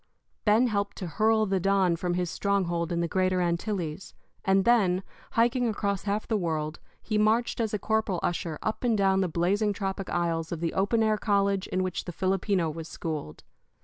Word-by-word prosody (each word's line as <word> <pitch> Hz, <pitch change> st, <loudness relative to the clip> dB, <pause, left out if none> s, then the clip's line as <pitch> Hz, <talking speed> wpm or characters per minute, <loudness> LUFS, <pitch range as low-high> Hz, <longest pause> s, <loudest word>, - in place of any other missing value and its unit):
Ben 215 Hz, +3 st, +5 dB
helped 200 Hz, -4 st, -1 dB
to 185 Hz, -, -4 dB
hurl 220 Hz, +5 st, +2 dB
the 195 Hz, -2 st, 0 dB
Don 190 Hz, -2 st, +2 dB
from 175 Hz, +1 st, -2 dB
his 180 Hz, -2 st, -1 dB
stronghold 175 Hz, -4 st, 0 dB
in 170 Hz, 0 st, 0 dB
the 170 Hz, -, 0 dB
Greater 185 Hz, +1 st, +1 dB
Antilles; 175 Hz, -1 st, -2 dB, 0.3 s
and 195 Hz, 0 st, +3 dB
then, 195 Hz, -6 st, +3 dB, 0.3 s
hiking 240 Hz, +2 st, +2 dB
across 200 Hz, -3 st, -1 dB
half 205 Hz, +1 st, -1 dB
the 220 Hz, -, +1 dB
world, 155 Hz, -3 st, -2 dB, 0.2 s
he 215 Hz, -1 st, 0 dB
marched 225 Hz, +4 st, +2 dB
as 220 Hz, -2 st, -1 dB
a 210 Hz, -, 0 dB
corporal 215 Hz, -3 st, 0 dB
usher 170 Hz, -2 st, -2 dB
up 220 Hz, -, -2 dB
and 235 Hz, -3 st, +2 dB
down 195 Hz, -1 st, +3 dB
the 185 Hz, -, +1 dB
blazing 195 Hz, +6 st, +1 dB
tropic 195 Hz, -1 st, -4 dB
aisles 165 Hz, -2 st, -1 dB
of 170 Hz, -, -3 dB
the 165 Hz, 0 st, -2 dB
open 210 Hz, +4 st, +2 dB
air 215 Hz, -1 st, +2 dB
college 200 Hz, -2 st, +1 dB
in 185 Hz, -, -1 dB
which 185 Hz, -1 st, -3 dB
the 175 Hz, -, -5 dB
Filipino 190 Hz, 0 st, 0 dB
was 160 Hz, +1 st, -5 dB
schooled. 155 Hz, -, -5 dB
195 Hz, 190 wpm, -27 LUFS, 175-210 Hz, 0.3 s, Ben